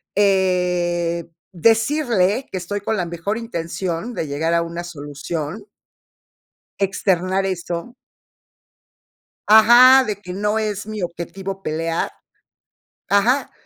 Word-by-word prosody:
eh, 180 -3 +1 0.2
decirle 225 - +2
que - - -3
estoy 200 +3 -4
con 220 +2 -1
la 180 - -1
mejor 170 +5 -3
intención 185 -1 -4
de 165 -7 -3
llegar 155 +4 -1
a 170 - +3
una 170 +1 -5
solución 155 +3 -6 1.1
externar 190 -1 0
eso 180 +3 -4 1.6
Ajá, 240 +5 +8
de 210 -4 -3
que 180 -3 -8
no 210 +2 0
es 210 -2 -3
mi 215 -1 -5
objetivo 190 +3 -5
pelear, 165 +1 -2 1.0
ajá, 230 +8 +2
190 Hz, 105 wpm, -20 LUFS, 170-215 Hz, 1.6 s, Ajá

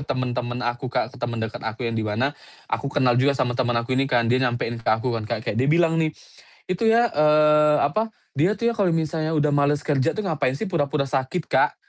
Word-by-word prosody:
temen-temen 125 -1 -2
aku, 120 +1 -3
Kak, 120 0 -2
ke - - -14
temen 120 -1 -3
deket 110 - -6
aku 115 +2 -5
yang 115 - -1
dimana 115 +5 -1 0.4
aku 140 - -1
kenal 130 -3 +2
juga 140 +1 +2
sama 125 -2 0
temen 120 -1 0
aku 115 +2 -1
ini 135 +1 +1
kan 120 -2 +2
dia 130 - +2
nyampein 120 -2 -1
ke - - -5
aku 115 +3 +1
kan 110 -2 -4
kayak 115 0 -2
dia 135 - +1
bilang 165 +1 +3
nih, 160 - +2 0.6
"Itu 185 +5 0
ya," 230 +1 +4
eee, 150 0 +4
apa, 220 +10 -1 0.2
"dia 180 +8 +3
tuh 235 +3 0
ya, - - -1
kalau 180 -5 +2
misalnya 160 0 -1
udah 150 -1 +2
males 145 0 +1
kerja 145 +1 0
tuh, 215 - -3
ngapain 145 -8 -1
sih 190 +7 -4
pura-pura 145 -3 0
sakit," 135 +5 -2
Kak. - - +3
140 Hz, 220 wpm, -23 LUFS, 120-155 Hz, 0.6 s, ya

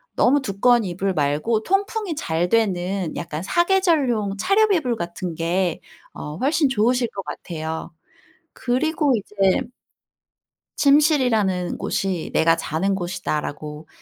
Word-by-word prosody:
너무 280 +3 +3
두꺼운 235 +2 +3
이불 190 +1 -2
말고 155 +10 0
통풍이 395 - -1
잘 170 - -1
되는 190 -5 0
약간 155 -2 -5
4 345 - +2
계절용 275 - +1
차렵 405 - +3
이불 255 -9 0
같은 175 -2 -5
게 170 +1 -1 0.3
어 150 +2 -7
훨씬 285 - +2
좋으실 245 +1 +2
것 195 - -4
같아요. 160 0 -6 0.6
그리고 290 +3 0
이제 200 -2 +1 1.2
침실이라는 250 - +3
곳이 185 -4 -2
'내가 165 +1 +4
자는 190 +7 -1
곳이다.'라고 155 -4 -4
200 Hz, 250 characters per minute, -22 LUFS, 175-265 Hz, 1.2 s, 내가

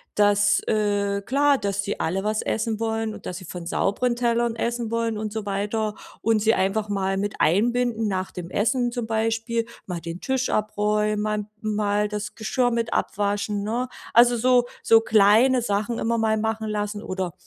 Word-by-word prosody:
dass, 205 0 +4
äh 205 -2 0
klar, 280 +2 +3
dass 200 -1 -1
sie 200 - -4
alle 190 +4 -1
was 215 0 0
essen 220 -1 -2
wollen 225 -1 -1
und - - -9
dass 180 - -4
sie 185 - -10
von 170 0 -7
sauberen 240 +7 0
Tellern 235 -1 +1
essen 235 0 -2
wollen 230 -1 -1
und 215 -1 -4
so 220 -1 -4
weiter 210 +2 -1 0.3
und 225 -1 +2
sie 225 +2 +3
einfach 205 +3 0
mal 195 -1 -1
mit 205 +1 -2
einbinden 230 +5 +2
nach 190 -2 -2
dem 175 -1 -7
Essen 240 +4 +1
zum 240 -1 -3
Beispiel, 225 +1 -1 0.2
mal 180 -3 -4
den 170 +1 -6
Tisch 265 +2 -1
abräumen, 210 0 0
mal 210 -1 -1 0.2
mal 210 -1 0
das 210 0 -5
Geschirr 245 +2 0
mit 230 -1 -1
abwaschen, 205 0 -1
ne? 235 +5 -2 0.3
Also, 240 +1 +7
so 245 +1 +3 0.2
so 225 0 +6
kleine 225 +4 +4
Sachen 210 +2 -1
immer 230 +1 0
mal 220 -1 +1
machen 220 0 -2
lassen. 210 0 -3
Oder 185 -2 -3
215 Hz, 180 wpm, -24 LUFS, 205-230 Hz, 0.3 s, Also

